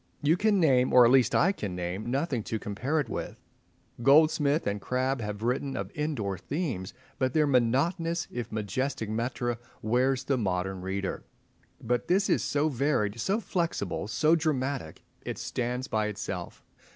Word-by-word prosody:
You 155 +3 +4
can 205 +1 +2
name—or 125 -5 +5
at 120 - +5
least 130 -2 +4
I 190 - +4
can 105 - -5
name—nothing 115 - -2
to 110 - -2
compare 125 +10 -2
it 145 - -1
with. - - -5 0.6
Goldsmith 150 +2 +4
and 100 0 -2
Crabbe 130 +3 -1
have 105 0 -5
written 130 +3 -1
of - - -4
indoor 125 - -2
themes; 130 - -3 0.2
but 130 -1 +1
their 155 -1 +4
monotonous, 155 +7 +1
if 120 -2 -5
majestic 110 +2 -2
metre, 120 +1 -2 0.2
wearies 130 +4 +2
the 135 -1 0
modern 95 -2 -1
reader. 95 +1 -3 0.6
But 120 +1 -1
this 195 +2 +2
is - - +2
so 145 +2 +1
varied, 125 -6 0
so 195 - +1
flexible, 170 - -2
so 155 +9 +3
dramatic. 140 - -2 0.2
It - - -4
stands 125 +1 -3
by 110 -1 0
itself. 100 -4 -5
125 Hz, 150 wpm, -28 LUFS, 110-150 Hz, 0.6 s, name—or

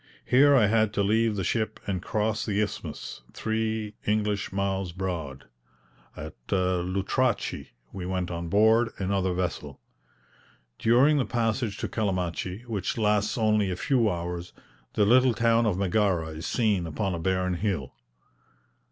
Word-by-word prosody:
Here 140 +3 +5
I 120 -5 +5
had 110 0 +2
to 100 - +1
leave 110 +2 +2
the 95 - -2
ship 110 +4 -1
and 95 -3 -2
cross 110 +3 -1
the 105 -2 -1
Isthmus, 105 - -4
three 110 -1 -2
English 105 -1 0
miles 95 -2 -2
broad. 85 -8 -4 0.7
At 75 0 -7 0.2
Lutrachi 95 0 0 0.3
we 90 -2 -5
went 90 -1 -2
on 85 0 -4
board 110 +4 +4
another 95 -1 0
vessel. 80 -6 -3 1.0
During 130 +7 +4
the 130 - +1
passage 115 -2 -1
to - - -3
Calamachi, 95 0 -2
which 105 -4 -3
lasts 105 0 +1
only 105 -3 +2
a 90 - -2
few 120 +2 +2
hours, 85 -1 -4 0.4
the 105 - +3
little 125 +2 +5
town 115 +1 +3
of 95 -4 0
Megara 95 -4 +1
is 80 +2 -6
seen 105 -7 +1
upon 90 +5 -2
a 85 - -3
barren 95 +1 0
hill. 90 -8 -2
100 Hz, 145 wpm, -27 LUFS, 90-110 Hz, 1.0 s, Here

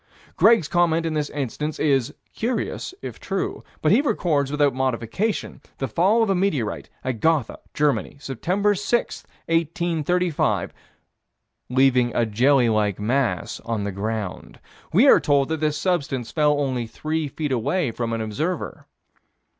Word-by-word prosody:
Greg's 220 -8 +5
comment 165 0 +2
in 165 - -1
this 150 -1 -1
instance 145 +2 -3
is: 135 -5 +2 0.2
"Curious 245 +9 -3
if - - -7
true." - - -3 0.2
But - - +4
he - - +5
records 170 - 0
without 145 -2 +2
modification 130 - -2 0.2
the 135 - -2
fall 200 - +3
of 220 - 0
a - - +4
meteorite 175 - -1
at 130 -3 -3
Gotha, 160 -6 +1 0.2
Germany, 145 -1 0
Sept. 180 - 0
6, 240 +3 -1 0.2
1835, 165 +1 0 1.0
"leaving 125 -1 +3
a 120 - +2
jelly 125 +4 +3
like 105 -3 +1
mass 120 +4 -1
on 115 -2 -3
the 100 - -2
ground." 105 0 -5 0.3
We 225 - +5
are - - +8
told 140 -2 +2
that 160 -1 -1
this 150 -1 0
substance 140 -8 -1
fell 150 -2 +2
only 130 -4 -1
three 155 +5 -3
feet 145 +1 -4
away 130 +4 0
from 115 0 -3
an 115 -1 -2
observer. 150 - -3
145 Hz, 145 wpm, -23 LUFS, 120-170 Hz, 1.0 s, are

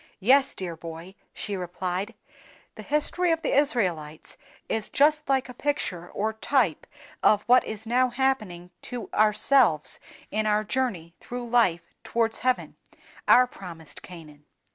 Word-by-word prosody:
"Yes, 265 +7 +4
dear 175 -3 -3
boy," 165 +3 -9 0.2
she 205 - -5
replied, 180 +1 -4 0.6
"the - - -10
history 300 +4 0
of 325 0 -1
the - - 0
Israelites 180 - 0 0.3
is 220 -2 -2
just 300 +1 +2
like 270 -1 +2
a 250 - -9
picture 225 - -2
or 220 +2 -2
type 220 - 0 0.3
of 210 -1 +4
what 250 +1 +5
is 220 0 -6
now 250 +3 +2
happening 225 -9 -2
to 240 -6 -7
ourselves 215 - +3 0.3
in 215 +1 0
our 210 0 +2
journey 210 -9 -2
through 245 0 -6
life 230 -8 +3 0.2
towards 230 -1 0
heaven, 255 0 -1 0.5
our 250 - +7
promised 165 -10 -10
Canaan. 155 -5 -13
215 Hz, 140 wpm, -26 LUFS, 180-255 Hz, 0.6 s, our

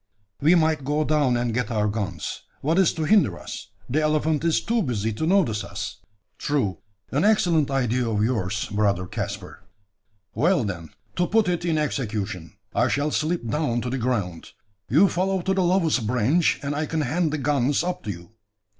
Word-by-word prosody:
We 160 +5 +5
might 160 -3 +2
go 150 +3 +1
down 145 -5 +2
and 120 -1 -1
get 125 -2 -1
our 105 -2 +1
guns. 105 -2 -3 0.2
What 160 +6 +2
is 190 - +4
to 160 - -3
hinder 155 - +3
us? - - -8 0.2
the 150 +5 +1
elephant 155 0 +1
is 165 -1 +3
too 230 0 0
busy 115 - -1
to 155 +9 -2
notice 165 - +2
us." 100 +1 -6 0.4
"True 125 - 0 0.3
an 145 +5 +1
excellent 175 -9 +3
idea 125 -3 0
of 105 -1 +1
yours, 110 -3 -1
brother 105 -3 +1
Caspar." 100 -2 -6 0.7
"Well, 165 +4 +2
then, 85 -6 -5 0.3
to 175 0 +2
put 220 +1 +3
it 175 -1 -1
in 165 -2 +1
execution. 105 - -3 0.2
I 120 - +2
shall 145 +4 0
slip 155 -4 -1
down 120 -1 0
to 125 - -3
the 135 - -2
ground; 105 -9 -2 0.4
you 160 - +6
follow 185 0 0
to 190 - +1
the 190 - +1
lowest 165 - +2
branch, 125 +9 +2
and 140 +1 -2
I 150 +1 -2
can 160 0 -1
hand 155 +4 0
the 150 - -1
guns 140 0 +1
up 180 0 -3
to - - -4
you. 85 0 -7
140 Hz, 185 wpm, -24 LUFS, 110-160 Hz, 0.7 s, you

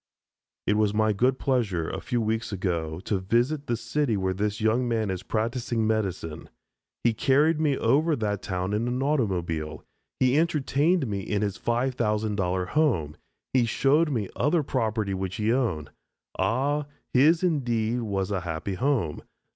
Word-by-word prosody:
It 105 - +2
was 105 -1 +2
my 110 0 +3
good 125 +6 +2
pleasure, 105 - 0
a - - -4
few 120 - -1
weeks 110 +1 -1
ago, 85 -5 -2
to 100 0 -1
visit 120 +10 0
the 120 - 0
city 120 0 0
where 95 -1 0
this 105 +2 -2
young 115 +3 +2
man 110 -4 0
is 95 -1 -3
practising 115 +1 -1
medicine. 95 -8 -2 0.5
He 115 - +3
carried 150 +7 +3
me 145 -3 +2
over 155 +3 +3
that 105 -5 -2
town 95 0 -2
in 110 +3 0
an 125 +2 -1
automobile, 90 - -1 0.4
he 130 +3 +4
entertained 155 +1 +2
me 100 -4 -2
in 100 +2 -1
his 100 -2 -2
$5000 105 -7 0
home, 95 - +1 0.4
he 125 -3 +3
showed 145 +7 +3
me 115 -8 -1
other 155 +2 +2
property 110 -6 -1
which 95 -1 -3
he 110 +1 +1
owned. 100 - -1 0.5
Ah, 145 +5 +1 0.3
his 155 +7 +5
indeed 120 -8 +1
was 100 -3 -2
a 95 -3 -1
happy 85 +3 -4
home. 115 - 0
110 Hz, 155 wpm, -26 LUFS, 95-130 Hz, 0.5 s, his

